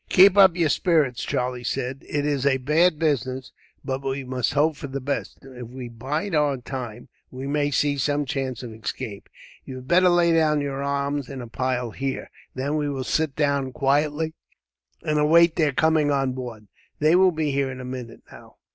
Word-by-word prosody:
"Keep 190 Hz, +1 st, +7 dB
up 190 Hz, -3 st, +6 dB
your 165 Hz, -3 st, +2 dB
spirits," 150 Hz, -8 st, +1 dB
Charlie 125 Hz, 0 st, -2 dB
said. 130 Hz, +2 st, -3 dB
"It 145 Hz, -1 st, -1 dB
is 145 Hz, -3 st, 0 dB
a 140 Hz, -2 st, +3 dB
bad 155 Hz, +6 st, +2 dB
business, 130 Hz, -5 st, -1 dB, 0.3 s
but 135 Hz, 0 st, -2 dB
we 135 Hz, 0 st, -2 dB
must 130 Hz, 0 st, -2 dB
hope 155 Hz, +2 st, +3 dB
for 140 Hz, -, -7 dB
the 135 Hz, 0 st, -4 dB
best. 140 Hz, +2 st, -3 dB
If 125 Hz, -3 st, -9 dB
we 125 Hz, 0 st, -8 dB
bide 145 Hz, -, -3 dB
our 145 Hz, -3 st, +2 dB
time, 125 Hz, -2 st, -7 dB, 0.2 s
we 130 Hz, +1 st, -7 dB
may 145 Hz, +1 st, 0 dB
see 145 Hz, 0 st, +1 dB
some 145 Hz, +2 st, 0 dB
chance 135 Hz, -4 st, -3 dB
of 115 Hz, -2 st, -7 dB
escape. 110 Hz, -1 st, -6 dB, 0.3 s
You 130 Hz, -, -8 dB
had 130 Hz, 0 st, -10 dB
better 180 Hz, +3 st, +5 dB
lay 175 Hz, -1 st, +4 dB
down 155 Hz, -2 st, +3 dB
your 140 Hz, -1 st, -3 dB
arms 140 Hz, -1 st, -2 dB
in 135 Hz, -2 st, -6 dB
a 120 Hz, -, -6 dB
pile, 125 Hz, 0 st, -2 dB
here. 135 Hz, +3 st, -4 dB, 0.2 s
Then 140 Hz, +3 st, -1 dB
we 145 Hz, -1 st, -1 dB
will 135 Hz, -2 st, -3 dB
sit 155 Hz, +1 st, 0 dB
down 140 Hz, -3 st, 0 dB
quietly, 150 Hz, +4 st, +1 dB, 0.7 s
and 155 Hz, -2 st, 0 dB
await 165 Hz, +2 st, +5 dB
their 155 Hz, -4 st, +2 dB
coming 155 Hz, +1 st, +2 dB
on 135 Hz, -2 st, +1 dB
board. 120 Hz, -5 st, -7 dB, 0.3 s
They 155 Hz, +3 st, +4 dB
will 185 Hz, +1 st, +6 dB
be 155 Hz, -3 st, -1 dB
here 140 Hz, -1 st, 0 dB
in 130 Hz, -1 st, -7 dB
a 130 Hz, -, -7 dB
minute, 125 Hz, -2 st, -7 dB
now." -, -, -14 dB
140 Hz, 195 wpm, -24 LUFS, 130-150 Hz, 0.7 s, Keep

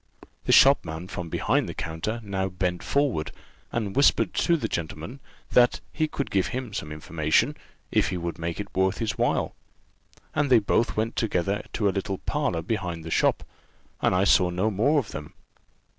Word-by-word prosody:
The -, -, +1 dB
shopman 90 Hz, -, +4 dB
from 85 Hz, -2 st, -5 dB
behind -, -, +1 dB
the -, -, -6 dB
counter 85 Hz, +8 st, -3 dB
now 95 Hz, -2 st, -2 dB
bent 90 Hz, -1 st, -2 dB
forward, 140 Hz, -, 0 dB, 0.4 s
and 105 Hz, -4 st, -2 dB
whispered 140 Hz, -, +4 dB
the 170 Hz, -3 st, +1 dB
gentleman 85 Hz, -, -5 dB, 0.3 s
that 125 Hz, -1 st, +4 dB
he 155 Hz, 0 st, +1 dB
could 140 Hz, -2 st, -4 dB
give 95 Hz, -2 st, +2 dB
him 125 Hz, -4 st, -5 dB
some 75 Hz, -5 st, -4 dB
information, 75 Hz, 0 st, +1 dB, 0.4 s
if -, -, +2 dB
he 95 Hz, -, -2 dB
would 85 Hz, -1 st, -4 dB
make 85 Hz, +2 st, -3 dB
it 100 Hz, -1 st, -7 dB
worth 95 Hz, 0 st, +2 dB
his 115 Hz, -2 st, -2 dB
while; -, -, +1 dB, 0.8 s
and 145 Hz, -1 st, +1 dB
they 125 Hz, -, +7 dB
both 110 Hz, +1 st, +1 dB
went 110 Hz, +2 st, -1 dB
together 100 Hz, -2 st, 0 dB
to 105 Hz, -, +1 dB
a -, -, +3 dB
little 95 Hz, -1 st, -2 dB
parlour 140 Hz, -, -1 dB
behind 90 Hz, -4 st, -3 dB
the 80 Hz, -, -7 dB
shop, -, -, +2 dB, 0.6 s
and -, -, +2 dB
I 90 Hz, -, +3 dB
saw 95 Hz, -2 st, +5 dB
no 95 Hz, +5 st, 0 dB
more 120 Hz, +10 st, +2 dB
of 130 Hz, -7 st, -1 dB
them. 75 Hz, -1 st, -8 dB
95 Hz, 175 wpm, -26 LUFS, 85-115 Hz, 0.8 s, they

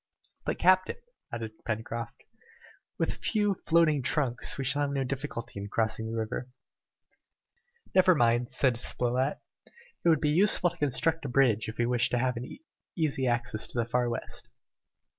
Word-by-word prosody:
"But, -, -, -1 dB
captain," 185 Hz, +1 st, +3 dB, 0.4 s
added 110 Hz, -2 st, -7 dB
Pencroft, 115 Hz, 0 st, -5 dB, 0.7 s
"with -, -, 0 dB
a -, -, -10 dB
few 205 Hz, -2 st, +1 dB
floating 160 Hz, -3 st, +4 dB
trunks 130 Hz, -2 st, 0 dB
we 135 Hz, -, -2 dB
shall 140 Hz, +3 st, +2 dB
have 145 Hz, -, +1 dB
no 140 Hz, -1 st, -1 dB
difficulty 125 Hz, -5 st, -5 dB
in 100 Hz, -, -5 dB
crossing 110 Hz, +1 st, 0 dB
the 115 Hz, -, -4 dB
river." 115 Hz, +3 st, -3 dB, 1.4 s
"Never 185 Hz, -1 st, +5 dB
mind," 120 Hz, -2 st, +2 dB
said 125 Hz, -4 st, +1 dB
Spilett, 125 Hz, +3 st, 0 dB, 0.7 s
"it 170 Hz, -, +4 dB
will 160 Hz, -, +6 dB
be 150 Hz, 0 st, 0 dB
useful 175 Hz, +1 st, +4 dB
to 170 Hz, -, -14 dB
construct 150 Hz, +2 st, 0 dB
a -, -, -3 dB
bridge 120 Hz, -5 st, +2 dB
if 110 Hz, -, -8 dB
we 120 Hz, -, +1 dB
wish 120 Hz, -1 st, +2 dB
to 120 Hz, -, 0 dB
have 125 Hz, +1 st, 0 dB
an 120 Hz, +2 st, -7 dB, 0.4 s
easy 140 Hz, -5 st, 0 dB
access 120 Hz, -2 st, 0 dB
to -, -, -7 dB
the 120 Hz, -, +1 dB
Far 120 Hz, +1 st, 0 dB
West!" 120 Hz, -, -6 dB
125 Hz, 165 wpm, -29 LUFS, 115-150 Hz, 1.4 s, will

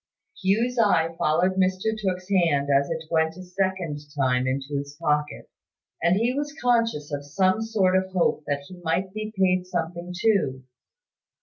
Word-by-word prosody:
Hugh's 230 Hz, +6 st, +1 dB
eye 165 Hz, -7 st, +3 dB
followed 180 Hz, +5 st, +2 dB
Mr 190 Hz, +3 st, +1 dB
Tooke's 185 Hz, -4 st, -3 dB
hand 165 Hz, -8 st, +2 dB
as 140 Hz, 0 st, +2 dB
it 160 Hz, -1 st, -3 dB
went 160 Hz, 0 st, +1 dB
a 185 Hz, -, -8 dB
second 180 Hz, -4 st, -2 dB, 0.2 s
time 130 Hz, -2 st, +2 dB
into 135 Hz, +2 st, -2 dB
his 140 Hz, 0 st, -4 dB
pocket; 150 Hz, -2 st, -1 dB, 0.5 s
and 170 Hz, +2 st, +3 dB
he 230 Hz, +5 st, +1 dB
was 290 Hz, +1 st, -3 dB
conscious 230 Hz, -12 st, +1 dB
of 145 Hz, 0 st, -3 dB
some 185 Hz, +8 st, +1 dB
sort 205 Hz, -5 st, +2 dB
of 190 Hz, 0 st, +1 dB
hope 175 Hz, -4 st, +1 dB
that 145 Hz, -1 st, -1 dB
he 175 Hz, +5 st, -13 dB
might 175 Hz, +3 st, -1 dB
be 215 Hz, 0 st, -4 dB
paid 185 Hz, -1 st, +2 dB
something 175 Hz, 0 st, -3 dB
too. 190 Hz, -, +1 dB
180 Hz, 165 wpm, -25 LUFS, 150-195 Hz, 0.5 s, eye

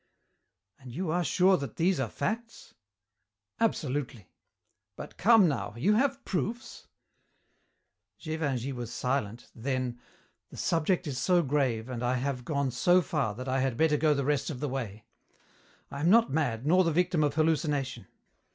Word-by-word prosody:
"And 130 Hz, -2 st, -11 dB
you 165 Hz, +5 st, -3 dB
are 175 Hz, +2 st, +1 dB
sure 185 Hz, +3 st, +3 dB
that 140 Hz, -3 st, -6 dB
these 175 Hz, +1 st, +1 dB
are 125 Hz, -4 st, -1 dB
facts?" 225 Hz, -, -5 dB, 0.9 s
"Absolutely." 140 Hz, -, -2 dB, 0.6 s
"But -, -, -9 dB
come 215 Hz, -2 st, +5 dB
now, 130 Hz, -7 st, -3 dB
you 180 Hz, -, +2 dB
have 275 Hz, +4 st, 0 dB
proofs?" 230 Hz, +7 st, -4 dB, 1.3 s
Gévingey 140 Hz, -5 st, -3 dB
was 120 Hz, -2 st, -6 dB
silent, 125 Hz, -3 st, -3 dB
then, 125 Hz, 0 st, -3 dB, 0.5 s
"The -, -, -12 dB
subject 170 Hz, +2 st, 0 dB
is 135 Hz, -4 st, -3 dB
so 175 Hz, +4 st, +3 dB
grave 130 Hz, -5 st, 0 dB
and 125 Hz, -2 st, -5 dB
I 125 Hz, +1 st, +1 dB
have 130 Hz, 0 st, -2 dB
gone 140 Hz, -2 st, -1 dB
so 175 Hz, +9 st, +3 dB
far 110 Hz, -6 st, -1 dB
that 125 Hz, +3 st, -7 dB
I 130 Hz, +1 st, 0 dB
had 130 Hz, -3 st, -1 dB
better 160 Hz, +1 st, +3 dB
go 150 Hz, 0 st, +2 dB
the 140 Hz, -1 st, -1 dB
rest 145 Hz, -1 st, 0 dB
of 140 Hz, -5 st, -5 dB
the 145 Hz, -, -2 dB
way. 115 Hz, -6 st, -5 dB, 0.9 s
I 140 Hz, -, -6 dB
am 160 Hz, +4 st, +2 dB
not 230 Hz, +3 st, +5 dB
mad 130 Hz, -5 st, -1 dB
nor 180 Hz, +5 st, +4 dB
the 165 Hz, -, +1 dB
victim 175 Hz, 0 st, +1 dB
of 145 Hz, -1 st, 0 dB
hallucination. 150 Hz, -4 st, 0 dB
145 Hz, 160 wpm, -29 LUFS, 130-175 Hz, 1.3 s, come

